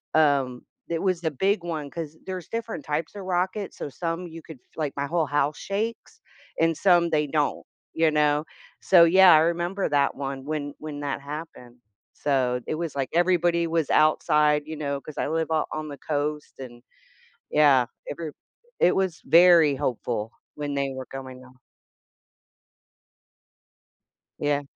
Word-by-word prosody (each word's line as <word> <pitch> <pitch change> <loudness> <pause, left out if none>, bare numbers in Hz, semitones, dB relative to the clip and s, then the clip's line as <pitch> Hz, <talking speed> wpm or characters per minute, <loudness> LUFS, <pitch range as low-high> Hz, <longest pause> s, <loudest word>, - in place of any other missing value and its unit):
um, 140 -5 +2 0.3
it 165 -1 -1
was 185 -3 0
the 160 -2 -1
big 190 +6 0
one 155 -4 -4
'cause 160 -1 -7
there's 185 -3 -6
different 230 -8 -5
types 150 +6 -3
of 200 - -7
rockets, 185 +2 -2
so - - -5
some 165 +4 -4
you 165 0 -10
could, 160 -4 -12 0.2
like, 150 -3 -2
my 140 - -1
whole 165 +2 0
house 145 +1 0
shakes 225 - -4 0.4
and 165 0 +3
some 175 0 +4
they 150 -2 +1
don't, 150 0 -1 0.3
you 160 0 +3
know. 150 0 +2 0.4
So 175 -3 +6
yeah, 180 +1 +7
I - - +8
remember 170 +4 0
that 140 -1 +2
one 135 -1 -5
when 145 -1 -3
when 150 -1 -7
that 140 -1 -3
happened. 140 -4 -9 0.4
So 130 -3 0
it - - -2
was 165 -2 -4
like 135 -2 -2
everybody 175 -1 +2
was 165 -3 0
outside, 150 -1 +3
you 160 +1 -6
know, 140 -2 -2
'cause 155 - -11
I - - -1
live 160 +1 -1
o 160 -1 +1
on 155 0 -4
the 140 - -8
coast 150 +1 -3
and 120 -2 -10 0.7
yeah, 140 -4 +5 0.2
every 160 0 -5 0.5
it 180 - +4
was 190 -3 -1
very 170 -4 +6
hopeful 115 -3 -3 0.2
when 145 -1 -4
they 140 -1 -1
were 130 -1 -6
coming 130 -1 -9
ho 130 - -16 2.9
Yeah. 145 -1 0
155 Hz, 160 wpm, -25 LUFS, 140-170 Hz, 2.9 s, I